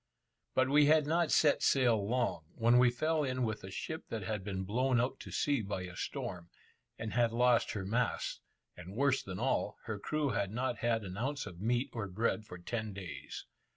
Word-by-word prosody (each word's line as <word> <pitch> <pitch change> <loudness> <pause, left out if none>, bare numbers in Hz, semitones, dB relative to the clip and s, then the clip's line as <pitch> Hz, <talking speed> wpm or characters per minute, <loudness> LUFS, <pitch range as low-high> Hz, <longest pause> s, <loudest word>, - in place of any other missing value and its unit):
But 130 0 +4
we 145 +2 +5
had 155 -1 +5
not 165 +1 +1
set 150 -2 +4
sail 120 -6 +3
long, 115 -7 0
when 120 +1 +5
we 125 0 +6
fell 155 +6 0
in 130 -2 -1
with 110 -2 -2
a 95 - -7
ship 160 +11 -5
that 110 -3 -3
had 105 0 -3
been 95 -1 -3
blown 125 +5 +1
out 130 +2 -1
to - - -9
sea 145 -4 +1
by 95 -2 -3
a 90 0 -8
storm, 85 -1 -5 0.5
and 110 -1 -5
had 120 -1 +3
lost 120 0 +3
her 100 -3 -3
masts; 115 +4 -1 0.3
and, 90 +3 -10
worse 140 +1 +2
than 95 -1 -6
all, - - 0
her 105 -2 -4
crew 150 +6 -1
had 100 -6 0
not 125 +2 -2
had 115 -2 +1
an 95 -1 -6
ounce 140 +5 -2
of 85 0 -9
meat 120 +5 0
or 110 -4 -3
bread 110 +3 -1
for 90 - -9
ten 110 +4 -4
days. 95 -3 -7
115 Hz, 205 wpm, -33 LUFS, 100-130 Hz, 0.5 s, we